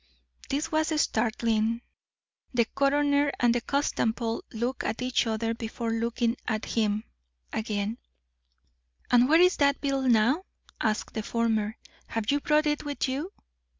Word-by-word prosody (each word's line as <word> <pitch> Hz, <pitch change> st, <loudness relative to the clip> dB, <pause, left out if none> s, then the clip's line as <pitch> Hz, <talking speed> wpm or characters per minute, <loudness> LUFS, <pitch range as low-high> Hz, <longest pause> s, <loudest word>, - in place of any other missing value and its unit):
This 300 Hz, +4 st, -1 dB
was 315 Hz, 0 st, +1 dB
startling. 225 Hz, -1 st, +1 dB, 0.7 s
The 235 Hz, -1 st, +4 dB
coroner 285 Hz, +2 st, +2 dB
and 240 Hz, -1 st, +4 dB
the 240 Hz, -, 0 dB
constable 230 Hz, -4 st, -1 dB
looked 240 Hz, +4 st, -2 dB
at 225 Hz, +3 st, -2 dB
each 250 Hz, -1 st, +1 dB
other 225 Hz, +1 st, -1 dB
before 230 Hz, 0 st, -4 dB
looking 230 Hz, +1 st, 0 dB
again 215 Hz, -1 st, 0 dB, 0.5 s
at 220 Hz, -, -1 dB
him. 205 Hz, +3 st, -2 dB, 1.1 s
"And 245 Hz, +1 st, +5 dB
where 320 Hz, +2 st, +6 dB
is 360 Hz, 0 st, +5 dB
that 280 Hz, -1 st, +3 dB
bill 275 Hz, -1 st, 0 dB
now?" 255 Hz, -, +3 dB, 0.4 s
asked 215 Hz, -1 st, -1 dB
the 220 Hz, -, -2 dB
former. 220 Hz, -1 st, 0 dB, 0.3 s
"Have 225 Hz, +1 st, -1 dB
you 285 Hz, -, +2 dB
brought 300 Hz, 0 st, +2 dB
it 295 Hz, -1 st, 0 dB
with 290 Hz, -1 st, -2 dB
you?" 285 Hz, +8 st, -3 dB
240 Hz, 140 wpm, -27 LUFS, 225-285 Hz, 1.1 s, where